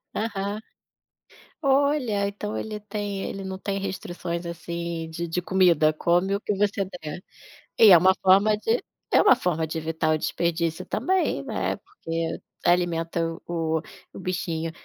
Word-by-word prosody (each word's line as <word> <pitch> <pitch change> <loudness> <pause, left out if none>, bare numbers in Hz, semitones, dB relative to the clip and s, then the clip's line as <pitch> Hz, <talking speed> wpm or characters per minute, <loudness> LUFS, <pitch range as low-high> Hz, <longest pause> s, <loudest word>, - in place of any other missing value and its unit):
Aham. 205 -1 -2 1.0
Olha, 270 -7 +2
então 205 +1 -4
ele 215 -1 -4
tem 205 -1 -4
ele 195 -1 -5
não 190 0 -4
tem 195 +1 -3
restrições, 175 -3 -4
assim, 170 -1 -4
de 170 +1 -4
de 180 +2 -1
comida, 175 -4 +4
come 175 +5 +2
o 200 - -3
que 210 - -1
você 200 0 +1 0.2
der. 155 +4 -6 0.5
E 220 -3 +8
é 175 - +10
uma 185 +2 +5
forma 200 +3 +5
de 450 - 0 0.3
é - - +6
uma - - +7
forma 170 -8 -1
de 160 +1 -4
evitar 160 0 0
o - - 0
desperdício 170 +2 -1
também, 375 0 0
né, - - -1
porque 165 - -4 0.2
alimenta 170 -1 +1 0.3
o 160 -2 -1 0.3
o - - -8
bichinho. 170 -3 -2
180 Hz, 150 wpm, -25 LUFS, 165-205 Hz, 1.0 s, é